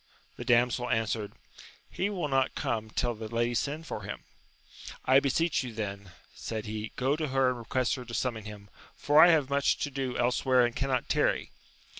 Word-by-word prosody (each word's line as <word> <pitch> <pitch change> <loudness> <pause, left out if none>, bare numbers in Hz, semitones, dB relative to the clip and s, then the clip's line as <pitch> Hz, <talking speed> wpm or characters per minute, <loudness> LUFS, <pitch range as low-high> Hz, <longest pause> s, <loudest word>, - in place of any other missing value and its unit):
The - - -7
damsel 125 0 +2
answered, 110 -2 -1 0.5
he 195 - -2
will 185 -7 -2
not 135 -2 +1
come 110 -1 -2
till 120 +2 -1
the 110 0 -7
lady 120 +1 0
send 145 +7 -2
for 110 - -5
him. 100 0 -7 0.8
I 130 +1 +6
beseech 145 +5 +1
you 125 -2 -6
then, 100 -3 -5 0.2
said 110 -2 -5
he, 110 0 -5
go 135 +3 +1
to 155 0 -2
her 135 -1 +2
and 125 -1 -3
request 125 +2 0
her 125 - -5
to 115 - -9
summon 115 -4 -2
him, 105 -1 -10 0.2
for 150 +2 +5
I - - +9
have 150 -5 +3
much 140 0 +2
to 145 - -3
do 130 -2 -3
elsewhere 125 +1 +3
and 120 - -3
cannot 130 -2 -1
tarry. - - +1
125 Hz, 190 wpm, -29 LUFS, 110-135 Hz, 0.8 s, I